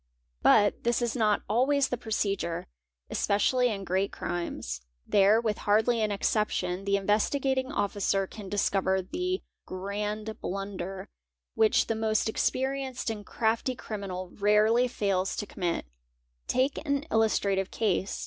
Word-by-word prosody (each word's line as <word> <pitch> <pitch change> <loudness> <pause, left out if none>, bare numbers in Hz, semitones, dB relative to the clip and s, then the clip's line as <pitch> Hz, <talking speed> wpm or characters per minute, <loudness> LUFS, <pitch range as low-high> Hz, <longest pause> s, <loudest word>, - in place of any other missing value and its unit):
But 205 -2 +4
this 235 0 +2
is 240 -1 -1
not 215 -4 +2
always 265 +6 +2
the - - 0
procedure, 200 -7 -2 0.5
especially 245 +5 +2
in 200 -3 -3
great 190 +2 0
crimes; 115 - -4 0.2
there, 205 +2 +5
with 220 -3 -1
hardly 220 +3 +2
an 215 -1 +1
exception, 195 -2 0
the 200 0 +2
Investigating 260 +7 +1
Officer 200 -1 0
can 200 0 -9
discover 190 -1 +1
the 360 - -2 0.2
'grand 210 +3 -4
blunder'', 195 -1 -4 0.5
which 220 -1 +3
the - - -1
most 220 -1 +1
experienced 265 +1 -1
and 210 -2 -6
crafty 230 +4 0
criminal 190 -5 -6
rarely 215 +4 +3
fails 195 -5 0
to 205 - -3
commit"), 175 - -2 0.6
Take 265 +3 +1
an 280 -2 0
illustrative 200 -3 +2
case. 200 -3 -1
210 Hz, 130 wpm, -28 LUFS, 195-235 Hz, 0.6 s, there